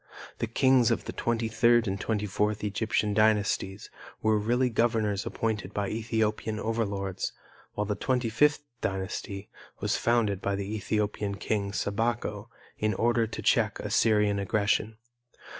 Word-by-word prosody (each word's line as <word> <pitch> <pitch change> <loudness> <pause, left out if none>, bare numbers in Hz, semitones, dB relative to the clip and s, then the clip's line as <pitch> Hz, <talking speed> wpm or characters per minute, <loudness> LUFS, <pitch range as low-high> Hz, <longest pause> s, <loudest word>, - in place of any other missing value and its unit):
The 115 - -1
kings 130 +1 +4
of - - 0
the - - -5
twenty 115 -1 -1
third 115 +1 +3
and 95 +1 -2
twenty 105 -2 -1
fourth 105 +2 -1
Egyptian 105 0 0
dynasties 105 -2 +1 0.3
were 110 -1 +2
really 120 +4 +1
governors 110 -3 +1
appointed 105 -3 -2
by 100 -1 -1
Ethiopian 110 -1 -1
overlords, 100 -4 -2 0.4
while 105 - -1
the 105 - -1
twenty 125 +1 0
fifth 150 +6 +3 0.2
dynasty 95 +1 -3 0.3
was - - 0
founded 110 -5 +1
by 100 - 0
the 100 +2 -3
Ethiopian 105 -1 -1
king, 100 0 -2
Sabako, 105 +1 -2 0.3
in 105 -1 +1
order 115 +1 +2
to 110 - -6
check - - +2
Assyrian 105 -2 +2
aggression. 100 +2 0
105 Hz, 140 wpm, -28 LUFS, 100-115 Hz, 0.4 s, kings